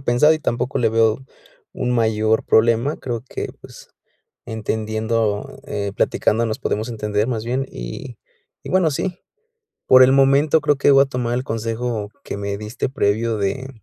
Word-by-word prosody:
pensado 135 +5 +4
y - - -3
tampoco 125 -3 -2
le 115 -2 +2
veo 115 +3 +2 0.5
un 125 - -2
mayor 110 -2 +1
problema, 115 +6 +3
creo 120 -1 -5
que, - - -5
pues, - - -13 0.6
entendiendo, 110 +2 -2
eh, 100 -6 -3
platicando 115 +3 +1
nos 110 -1 -3
podemos 110 +3 -2
entender 105 -2 -1
más 115 -4 -2
bien, 130 +3 -1
y 105 - -8 0.5
y, - - -8
bueno, 185 -3 +3
sí, 180 +5 -3 0.7
por 130 0 +8
el 130 - +5
momento, 140 +3 +4
creo 145 -1 +2
que 140 +1 +4
voy 135 0 +7
a - - -3
tomar 125 -3 -3
el 125 - -2
consejo 115 -1 -3
que - - -6
me 100 0 -3
diste 110 +5 -4
previo 115 -2 0
de 105 +7 -2
115 Hz, 165 wpm, -20 LUFS, 110-135 Hz, 0.7 s, por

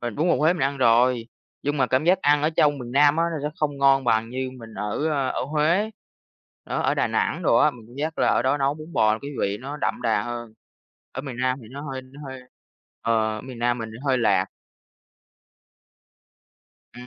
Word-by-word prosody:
Mình 120 -2 -4
bún 160 +4 +1
bò - - +4
Huế 155 +3 +3
mình 175 - -3
ăn 140 +1 0
rồi, 120 -1 +3 0.3
nhưng 145 +1 -1
mà 135 - +2
cảm 130 +3 +1
giác 180 +2 +4
ăn 145 0 +4
ở 155 - +2
trong 145 -1 +3
miền 120 -2 -7
Nam 145 +2 +5
á, 165 - +2
nó 150 -2 -2
sẽ - - -8
không 145 -2 -1
ngon 135 -1 +4
bằng 115 -1 +1
như 130 0 -3
mình 115 -2 -11
ở, 105 +9 -2
ơ, 140 -4 0
ở - - -2
Huế. 155 +9 +1 0.7
Đó, - - -3
ở - - +2
Đà - - +1
Nẵng - - -1
đồ - - +3
á, - - +5
mình 115 -3 -14
cảm 120 - -15
giác 155 +2 -3
là - - +3
ở - - +2
đó 135 +3 +1
nấu 140 +1 +1
bún 155 +2 -11
bò 110 -5 +3
cái 140 - -6
vị 100 +1 0
nó 140 +3 -6
đậm 135 - -2
đà 110 -3 +1
hơn. 120 0 -6 0.6
Ở 130 - -4
miền 135 -4 -7
Nam 130 0 +1
thì 110 - -13
nó 140 +2 -7
hơi 130 -1 -5
nó 130 +3 -15
hơi 130 -1 -8 0.6
ờ, 110 -1 +1
ở - - -6
miền 130 -2 -9
Nam 120 +1 +1
mình 115 -1 -5
thì 110 - -10
hơi 130 -2 +3
lạt. 115 - +2 2.5
Ừm. 125 0 -10
130 Hz, 230 wpm, -24 LUFS, 120-145 Hz, 2.5 s, Nam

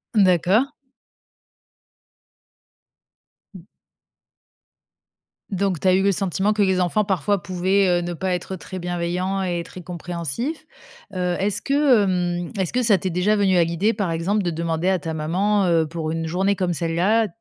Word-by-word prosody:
D'accord. 195 - +3 2.8
Mmh. 175 - -11 1.9
Donc, 195 -3 0
tu 190 - -1
as 185 - +5
eu 190 - +3
le 200 - +3
sentiment 195 +2 0
que 210 - 0
les 190 -1 +2
enfants 185 +4 +1
parfois 195 0 0
pouvaient, 185 +2 +1
heu, - - -3
ne 175 0 -4
pas 185 +2 -2
être 180 +2 -4
très 185 +1 -8
bienveillants 180 +2 -2
et 175 -2 -1
très 180 +1 -11
compréhensifs, 175 - -5 0.5
heu 180 -1 -1
est-ce 205 +1 0
que, 275 -6 +3
hem, 175 -2 -1
est-ce 190 -3 -2
que 250 - +1
ça 220 -4 +4
t'est 185 +1 -3
déjà 180 +5 +1
venue 195 -3 +2
à 170 - +5
l'idée 170 +7 0
par 200 -5 -2
exemple 185 +6 0
de 175 - -1
demander 165 +1 -2
à 190 -2 +1
ta 160 +1 -5
maman, 190 +6 +1
heu, 165 -2 +3
pour 160 0 -4
une 165 0 -2
journée 190 +4 +1
comme 185 -2 -1
celle-là, 175 +7 +1
185 Hz, 160 wpm, -22 LUFS, 175-200 Hz, 2.8 s, as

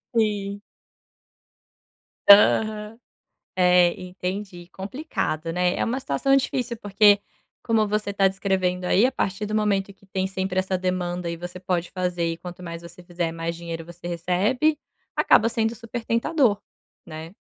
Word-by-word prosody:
Sim. 205 -2 0 1.7
Aham. 210 +1 +5 0.6
É, 180 -1 +5
entendi. 185 0 -6
Complicado, 190 - -3
né? 180 0 +1
É - - 0
uma 250 +3 -1
situação 255 - +1
difícil, 250 -3 -1
porque, 205 0 +4 0.4
como 220 -2 +2
você 210 -1 -1
tá 195 -1 +4
descrevendo 190 -2 -1
aí, 195 +5 +4
a 260 - +2
partir 200 -4 -2
do 215 +1 -3
momento 200 -2 0
que 195 - -24
tem 190 0 -2
sempre 190 -1 -2
essa 190 0 -1
demanda 180 -1 -2
e 170 - -4
você 175 +1 -8
pode 180 -2 -2
fazer, 180 -2 -1
e - - -9
quanto 180 +1 -9
mais 170 -1 -7
você 170 +1 -12
fizer, 175 -1 -3
mais 165 0 -4
dinheiro 165 -1 -6
você 175 +1 -10
recebe, 195 - +1 0.4
acaba 220 - +5
sendo 225 0 0
super 230 +1 -7
tentador, 230 -2 +1 0.4
né? 160 +2 -9
190 Hz, 150 wpm, -24 LUFS, 175-215 Hz, 1.7 s, Aham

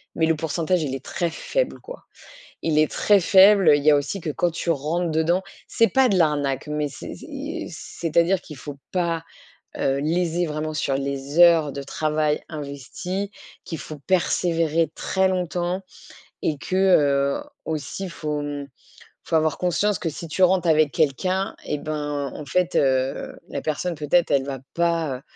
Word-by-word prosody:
mais 160 - +2
le 160 0 +2
pourcentage, 165 +2 0
il 135 -3 -2
est 135 - -7
très 175 - -1
faible - - -2
quoi. - - -11 0.6
Il 155 -2 +1
est 155 0 +3
très 205 -1 +4
faible. 190 -1 +7
Il 145 - -2
y 155 - +7
a 145 - +6
aussi 145 +7 -2
que 155 - -3
quand 175 +4 0
tu 170 +1 -3
rentres 165 +3 0
dedans 160 +4 +1 0.3
c'est 230 - +3
pas 265 -1 +4
de 200 - +2
l'arnaque, 145 -6 +1
mais 150 0 -1
c'est 140 - -8
c'est - - -12
i 300 - -5
c'est-à-dire 170 +2 0
qu'il 155 -5 -11
faut 145 0 -8
pas, 170 -3 -1 0.5
heu, 135 +1 +1
léser 170 +3 0
vraiment 155 0 -3
sur 140 -3 -1
les 140 +2 -3
heures 165 -4 +6
de 140 0 -5
travail 150 +1 0
investies. 155 +7 -5 0.3
Qu'il 165 - -6
faut 155 +1 -8
persévérer 165 -2 +1
très 190 0 +1
longtemps 180 0 -1 0.6
et 150 - 0
que, 185 - -3
heu, 145 - +3 0.2
aussi 160 +5 -4
faut, 150 -3 -3
hem, 145 -1 -5 0.6
faut - - -1
avoir 155 -1 +2
conscience 190 +3 +1
que 165 - -2
si 165 +2 -7
tu 185 +4 0
rentres 180 -1 +3
avec 155 -2 +4
quelqu'un 185 +6 0
et 150 - -2
ben, 145 -2 -3
en 150 - -7
fait, 180 +4 0
heu, 130 0 +1
la - - -4
personne 165 +3 -2
peut-être 155 +3 +1
elle 135 -1 +3
va 135 -1 -4
pas, 165 -5 0
heu, - - -15
160 Hz, 175 wpm, -23 LUFS, 145-180 Hz, 0.6 s, faible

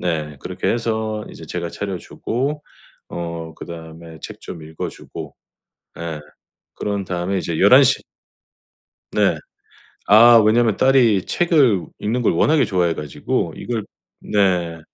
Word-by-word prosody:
네 80 -4 -2
그렇게 - - -3
해서 110 -2 -2
이제 80 - -11
제가 85 +2 -4
차려 100 0 -4
주고 140 - -3 0.5
어 85 -1 -5
그다음에 80 0 -10
책 - - -8
좀 80 - -8
읽어주고 80 0 -8 0.6
예 80 -2 -5 0.5
그런 100 -1 -3
다음에 90 +1 -2
이제 85 -3 -3
11 125 +8 +8
시 135 +1 +2 1.1
네. - - +2 0.7
아 115 +3 +8
왜냐하면 110 0 +3
딸이 125 -7 +4
책을 145 - +2
읽는 120 +4 -1
걸 - - +3
워낙에 150 - +3
좋아해 90 -4 +1
가지고 75 -2 -2
이걸 115 -3 -3 0.4
네. 90 -5 0
95 Hz, 235 characters per minute, -20 LUFS, 85-115 Hz, 1.1 s, 11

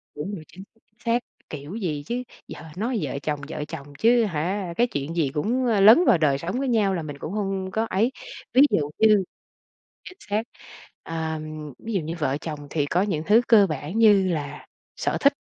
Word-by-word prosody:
Đúng 170 +8 -4
rồi, 165 - -9
chính 190 - -12
xác, 225 +3 -26
chính 215 +2 -43
xác, 235 +1 +2 0.3
kiểu 150 +5 -7
gì 160 -10 -3
chứ, 245 +8 -3 0.2
giờ - - -9 0.2
nói 230 +3 -1
vợ 140 -1 -3
chồng, 150 -2 -2
vợ 150 - -4
chồng 145 -2 -8
chứ 235 +1 +5
hả, 180 0 -2
cái 240 - +4
chuyện 145 - -4
gì 160 -5 +1
cũng, 230 +12 0
ơ, 225 -4 +2
lấn 225 - +8
vào - - +5
đời 150 -4 +2
sống 175 - -4
của - - -1
nhau 220 -6 +2
là 175 - -2
mình 145 -2 -7
cũng 155 +5 -6
không 195 -2 -2
có 220 +3 0
ấy. 220 +7 +1 0.4
Ví 260 - +6
dụ 145 -2 0
như 215 -3 +5 0.8
chính 365 - -10
xác. 210 +2 +1 0.6
Ờ, 160 -1 -3 0.4
ví 230 - -6
dụ 195 - +1
như 160 +2 -5
vợ 140 -2 0
chồng 155 -3 -5
thì 145 -1 0
có 170 +5 +1
những 180 -7 -1
thứ 215 +3 +6
cơ 210 -4 +6
bản 155 +4 -4
như 205 -4 +6
là 150 -5 -4 0.3
sở - - -1
thích. 280 0 +5
190 Hz, 215 wpm, -24 LUFS, 155-220 Hz, 0.8 s, lấn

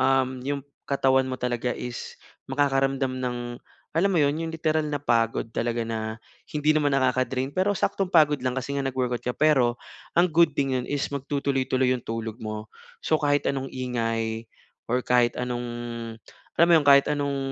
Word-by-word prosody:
um, 130 -1 +2
iyong 140 +1 -3 0.3
katawan 135 -1 +3
mo 130 - -3
talaga 125 0 -1
is, 125 -1 -6 0.3
makakaramdam 135 -1 +1
ng, 125 -1 -2 0.6
alam 195 +4 +4
mo - - +1
iyon, 145 +1 +2
yong 160 - -5
literal 155 -1 0
na 145 -1 -2
pagod 115 -4 +1
talaga 115 +1 -2
na, 110 0 -4 0.3
hindi 150 0 +2
naman 145 -2 +2
nakaka-drain 130 0 +1
pero 195 +2 +3
saktong 195 -1 -1
pagod 150 -3 +5
lang 130 - +1
kasi 135 +2 -3
nga 140 - -1
nag-workout 125 -2 -1
ka. 125 - 0
Pero 130 -6 +3 0.3
ang 175 +1 +4
good 165 -1 +4
thing 135 -2 0
iyon 125 - -2
is 145 -1 -1
magtutuloy-tuloy 135 -2 0
iyong 125 -2 0
tulog 115 -1 -4
mo. 110 -1 -6 0.3
So 155 - +2
kahit 145 -1 +1
anong 135 -1 -3
ingay 115 -3 -2 0.4
or 125 +2 +1
kahit 125 -1 +2
anong, 125 -1 -2 1.0
alam 170 - +8
mo - - +5
iyon 145 -3 +2
kahit 140 0 +7
anong, 140 -1 -1
130 Hz, 170 wpm, -25 LUFS, 125-145 Hz, 1.0 s, alam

